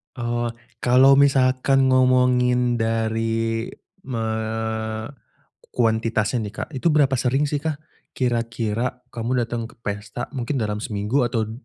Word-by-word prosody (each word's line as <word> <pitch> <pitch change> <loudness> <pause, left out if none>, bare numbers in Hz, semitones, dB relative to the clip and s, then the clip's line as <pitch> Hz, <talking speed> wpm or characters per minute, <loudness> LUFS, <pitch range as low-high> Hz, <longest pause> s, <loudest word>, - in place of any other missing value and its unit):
Eee, 120 -1 -2 0.3
kalau 130 +3 +5
misalkan 135 -1 +3
ngomongin 125 -1 +3
dari, 115 0 -1 0.4
eee, 110 -1 -3 0.7
kuantitasnya 110 -1 +1
nih, 100 - -9
Kak, - - -5
itu 135 +1 -5
berapa 140 -3 +3
sering, 135 +3 +1
sih, 145 - 0
Kak? 155 0 -4 0.3
Kira-kira 115 0 -2
kamu 120 +1 -1
datang 115 0 -3
ke - - -16
pesta 105 +4 -5
mungkin 135 0 -3
dalam 105 -5 -1
seminggu 110 +5 0
atau 115 -2 -2
120 Hz, 120 wpm, -22 LUFS, 110-130 Hz, 0.7 s, kalau